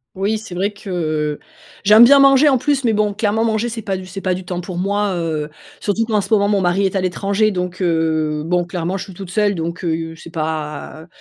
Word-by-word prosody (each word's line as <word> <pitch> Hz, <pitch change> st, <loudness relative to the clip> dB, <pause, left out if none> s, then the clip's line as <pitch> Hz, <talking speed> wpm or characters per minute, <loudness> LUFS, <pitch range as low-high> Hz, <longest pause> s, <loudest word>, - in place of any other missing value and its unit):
Oui, 205 Hz, +3 st, -1 dB
c'est 200 Hz, -5 st, -9 dB
vrai 200 Hz, +3 st, 0 dB
que, 155 Hz, -7 st, -3 dB, 0.5 s
j'aime 215 Hz, +3 st, +8 dB
bien 280 Hz, +4 st, +8 dB
manger 275 Hz, +2 st, +6 dB
en 265 Hz, -, +3 dB
plus, 275 Hz, +1 st, 0 dB
mais 225 Hz, -2 st, +2 dB
bon, 210 Hz, -1 st, +1 dB
clairement, 215 Hz, +2 st, 0 dB
manger 225 Hz, +1 st, 0 dB
c'est 225 Hz, -2 st, -6 dB
pas 195 Hz, -1 st, -2 dB
du 185 Hz, 0 st, -9 dB
c'est 195 Hz, +1 st, -7 dB
pas 185 Hz, -1 st, 0 dB
du 185 Hz, 0 st, -6 dB
temps 180 Hz, 0 st, -4 dB
pour 175 Hz, 0 st, -7 dB
moi, 200 Hz, +1 st, 0 dB
heu. 160 Hz, -3 st, -2 dB, 0.3 s
Surtout 220 Hz, +2 st, 0 dB
qu'en 215 Hz, -3 st, +1 dB
ce 220 Hz, -, -3 dB
moment 200 Hz, -1 st, +4 dB
mon 205 Hz, -2 st, +2 dB
mari 180 Hz, +2 st, +1 dB
est 190 Hz, -, -5 dB
à 190 Hz, -, +1 dB
l'étranger 200 Hz, +3 st, 0 dB
donc, 180 Hz, 0 st, -4 dB
heu, 160 Hz, -3 st, 0 dB
bon, 175 Hz, +2 st, +1 dB
clairement 175 Hz, +1 st, -3 dB
je -, -, -5 dB
suis 190 Hz, -, -11 dB
toute 185 Hz, 0 st, -9 dB
seule, 205 Hz, +1 st, +1 dB
donc, 170 Hz, +1 st, -4 dB
heu, 165 Hz, -1 st, -2 dB
c'est 165 Hz, -, -12 dB
pas 155 Hz, -1 st, -4 dB
heu, -, -, -17 dB
190 Hz, 240 wpm, -19 LUFS, 170-210 Hz, 0.5 s, j'aime